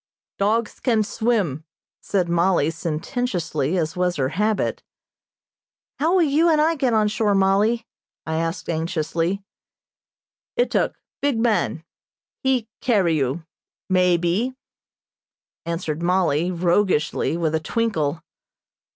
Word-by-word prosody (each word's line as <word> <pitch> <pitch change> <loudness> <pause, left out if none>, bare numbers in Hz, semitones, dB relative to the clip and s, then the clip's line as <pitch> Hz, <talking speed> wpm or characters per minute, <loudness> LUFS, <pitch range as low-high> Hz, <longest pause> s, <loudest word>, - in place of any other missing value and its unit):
"Dogs 215 +3 0
can 225 -4 +2
swim," 205 - 0 0.4
said 185 -3 0
Mollie, 170 -2 +2
sententiously, 165 - -2
as 160 -2 -1
was 180 -1 0
her 130 -2 0
habit. 210 +6 0 1.2
"How 320 +5 +2
will 365 - +5
you 315 +3 +3
and 310 -2 +4
I 315 +2 +3
get 265 -6 0
on 215 -1 +3
shore, 210 -1 +1
Mollie?" 205 +4 +2 0.4
I 160 0 -2
asked 165 +1 -2
anxiously. 165 +3 -1 1.1
"Ituk, - - +1 0.3
big 280 -4 +1
man, 205 - +1 0.6
he 260 -4 +1
carry 195 -10 +2
you, 145 +3 -1 0.4
may 180 -2 +4
be," 190 +10 0 1.1
answered 165 -2 -3
Mollie, 175 -2 +2
roguishly, 175 -2 +1
with 160 -2 0
a 160 - +2
twinkle. 165 -4 -1
185 Hz, 115 wpm, -22 LUFS, 165-225 Hz, 1.2 s, will